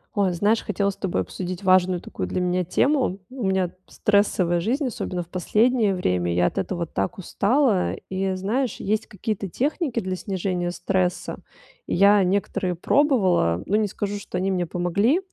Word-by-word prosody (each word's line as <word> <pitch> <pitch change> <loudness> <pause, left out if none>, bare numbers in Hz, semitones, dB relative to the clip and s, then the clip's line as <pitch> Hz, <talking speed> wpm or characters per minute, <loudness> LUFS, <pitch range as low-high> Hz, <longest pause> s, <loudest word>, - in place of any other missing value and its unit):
Ой, 200 -2 +2
знаешь, 205 +6 +2
хотела 200 -1 0
с - - -13
тобой 180 - -1
обсудить 175 - -5
важную 185 -1 +4
такую - - -5
для - - -2
меня 180 0 +1
тему. 255 - +1
У 260 -2 -6
меня 190 -2 +1 0.2
стрессовая 200 -4 +2
жизнь, 255 - 0
особенно 185 -7 -3
в - - -20
последнее 215 +3 +2
время. 90 - 0
Я 90 - +3
от - - 0
этого 170 - -2
так 95 - -3
устала. 205 - +1 0.2
И 190 0 -1
знаешь, 225 +7 -1
есть 215 +2 -1
какие-то 205 -1 -4
техники 280 - -1
для 185 -3 -3
снижения 185 -2 -2
стресса. 180 0 -1 0.5
И - - -1
я 200 +2 +6
некоторые 185 0 0
пробовала, 185 - +2
ну, 205 - 0
не 215 -1 +2
скажу, 205 +1 -4
что 185 - -6
они 190 +2 0
мне 180 -2 -1
помогли, 200 - +1
190 Hz, 170 wpm, -24 LUFS, 180-210 Hz, 0.5 s, я